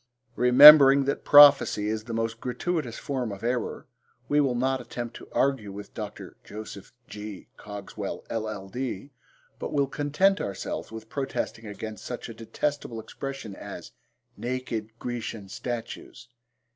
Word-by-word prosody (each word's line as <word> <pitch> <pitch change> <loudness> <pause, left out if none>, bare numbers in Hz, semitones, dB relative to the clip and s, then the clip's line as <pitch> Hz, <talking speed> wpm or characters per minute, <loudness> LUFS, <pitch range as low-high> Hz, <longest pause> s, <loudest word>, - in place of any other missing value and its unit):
Remembering 135 +2 +9
that 140 - -2
prophecy 145 -7 +7
is 110 0 -3
the 115 - -7
most 115 0 -2
gratuitous 135 -1 -3
form 130 -6 -3
of 100 +1 -9
error, 120 +1 -2 0.4
we 150 +1 +3
will 135 -3 +1
not 130 +2 0
attempt 120 -1 -7
to - - -13
argue 135 -7 0
with 100 +1 -10
Dr. - - -8
Jos. 105 -2 -9 0.2
G. 105 -2 -9
Cogswell, 105 -1 -7
LL.D., 110 +3 -5 0.5
but - - -5
will 140 -1 +2
content 150 +8 +1
ourselves 100 +2 -5
with 110 0 -9
protesting 135 -4 -4
against 105 +1 -7
such 125 -1 -6
a - - -7
detestable 115 +2 -4
expression 135 -3 -7
as 95 -4 -9 0.4
'naked 120 -3 -4
Grecian 115 -4 -5
statues.' 120 +2 -7
120 Hz, 135 wpm, -26 LUFS, 110-135 Hz, 0.5 s, Remembering